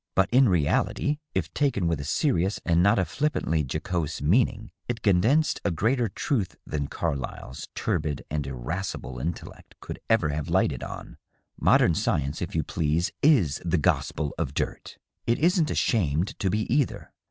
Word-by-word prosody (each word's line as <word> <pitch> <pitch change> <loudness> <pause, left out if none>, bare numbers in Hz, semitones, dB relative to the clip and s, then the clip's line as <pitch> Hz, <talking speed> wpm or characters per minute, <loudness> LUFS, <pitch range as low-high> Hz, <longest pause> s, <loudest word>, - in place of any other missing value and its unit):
But 95 - +3
in 130 -1 +5
reality, 90 - +1 0.2
if - - -2
taken 135 - +1
with 85 -3 0
a - - -4
serious 100 - +1
and 85 0 +3
not 100 +3 +4
a 95 - +2
flippantly 140 - 0
jocose 80 -1 -2
meaning, 110 - +1 0.2
it 120 -2 -4
condensed 115 - +3
a - - +1
greater 115 +7 +1
truth 105 - -2
than 70 -2 -3
Carlyle's 65 -2 -4
turbid 75 -2 -2
and 75 -1 -3
irascible 65 -1 -4
intellect 80 +6 -6
could - - -7
ever 110 -9 +3
have 75 +2 -3
lighted 80 -7 +1
on. - - -8 0.4
Modern 85 - +4
science, 75 -1 -1
if - - -4
you - - +1
please, 80 +1 0
is 115 - +3
the 90 +1 +1
gospel 75 -1 0
of - - -2
dirt. - - -4 0.3
It 115 - +3
isn't 170 -1 +2
ashamed 85 - +1
to 100 -2 +1
be, 105 +4 0
either. 145 -3 -1
90 Hz, 160 wpm, -26 LUFS, 75-115 Hz, 0.4 s, in